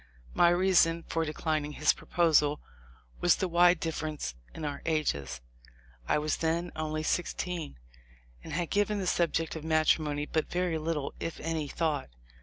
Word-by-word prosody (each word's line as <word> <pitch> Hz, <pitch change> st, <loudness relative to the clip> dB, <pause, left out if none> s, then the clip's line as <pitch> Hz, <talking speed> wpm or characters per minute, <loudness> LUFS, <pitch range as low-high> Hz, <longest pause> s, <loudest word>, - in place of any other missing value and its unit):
My 175 Hz, -, +5 dB
reason 175 Hz, -2 st, +3 dB
for 165 Hz, 0 st, -1 dB
declining 155 Hz, -1 st, -2 dB
his 150 Hz, +1 st, +3 dB
proposal 150 Hz, -4 st, +2 dB, 0.6 s
was 175 Hz, -, +4 dB
the 190 Hz, -, -1 dB
wide 175 Hz, 0 st, +5 dB
difference 155 Hz, -, -3 dB, 0.2 s
in 155 Hz, -, -6 dB
our 145 Hz, -1 st, -4 dB
ages. 70 Hz, -, -1 dB, 0.7 s
I -, -, +3 dB
was 150 Hz, 0 st, 0 dB
then 170 Hz, +2 st, -1 dB
only 155 Hz, 0 st, -2 dB
sixteen, 175 Hz, -, -2 dB, 0.7 s
and -, -, -8 dB
had 170 Hz, 0 st, -2 dB
given 205 Hz, +1 st, +1 dB
the 195 Hz, -, -2 dB
subject 165 Hz, -2 st, 0 dB
of 160 Hz, -, -6 dB
matrimony 155 Hz, -2 st, +2 dB
but 155 Hz, +1 st, -1 dB
very 175 Hz, -2 st, 0 dB
little, 155 Hz, -2 st, -2 dB
if 165 Hz, -, -4 dB
any, 160 Hz, -1 st, -2 dB
thought. 150 Hz, -2 st, -1 dB
160 Hz, 150 wpm, -30 LUFS, 150-170 Hz, 0.7 s, My